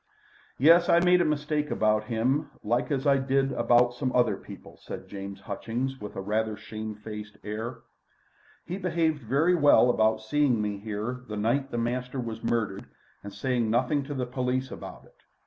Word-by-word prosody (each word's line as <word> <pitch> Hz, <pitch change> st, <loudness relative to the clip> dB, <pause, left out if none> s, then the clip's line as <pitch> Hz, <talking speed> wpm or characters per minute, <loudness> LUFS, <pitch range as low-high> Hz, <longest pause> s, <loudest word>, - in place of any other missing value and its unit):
"Yes. 170 Hz, +5 st, +6 dB
I 170 Hz, -, +6 dB
made 180 Hz, 0 st, +4 dB
a -, -, +2 dB
mistake 150 Hz, 0 st, -1 dB
about 110 Hz, 0 st, +1 dB
him 130 Hz, +7 st, 0 dB
like 120 Hz, +3 st, 0 dB
as 140 Hz, -1 st, -1 dB
I 140 Hz, -1 st, +4 dB
did 135 Hz, 0 st, +1 dB
about 120 Hz, -1 st, +3 dB
some 130 Hz, +1 st, -2 dB
other 120 Hz, -5 st, +3 dB
people," -, -, -12 dB
said -, -, -8 dB
James 100 Hz, 0 st, -7 dB
Hutchings, 120 Hz, +6 st, -4 dB
with 105 Hz, -, -7 dB
a -, -, -3 dB
rather 110 Hz, +2 st, -1 dB
shame 110 Hz, -1 st, -6 dB
faced 105 Hz, -1 st, -8 dB
air. 115 Hz, +3 st, -5 dB, 0.8 s
"He 185 Hz, +3 st, -4 dB
behaved 165 Hz, -5 st, 0 dB
very 140 Hz, +10 st, +2 dB
well 145 Hz, -6 st, +5 dB
about 110 Hz, -1 st, +2 dB
seeing 135 Hz, 0 st, +2 dB
me 105 Hz, -1 st, -2 dB
here 110 Hz, +4 st, -4 dB
the 105 Hz, -, -5 dB
night 125 Hz, +6 st, 0 dB
the 120 Hz, -, -4 dB
master 125 Hz, +2 st, -2 dB
was 115 Hz, -2 st, -5 dB
murdered 105 Hz, -4 st, -1 dB, 0.4 s
and 100 Hz, -, -7 dB
saying 120 Hz, +2 st, -1 dB
nothing 130 Hz, +6 st, +2 dB
to 145 Hz, 0 st, -5 dB
the 130 Hz, -1 st, -1 dB
police 130 Hz, +1 st, -2 dB
about -, -, -9 dB
it. -, -, -25 dB
125 Hz, 180 wpm, -27 LUFS, 110-140 Hz, 0.8 s, Yes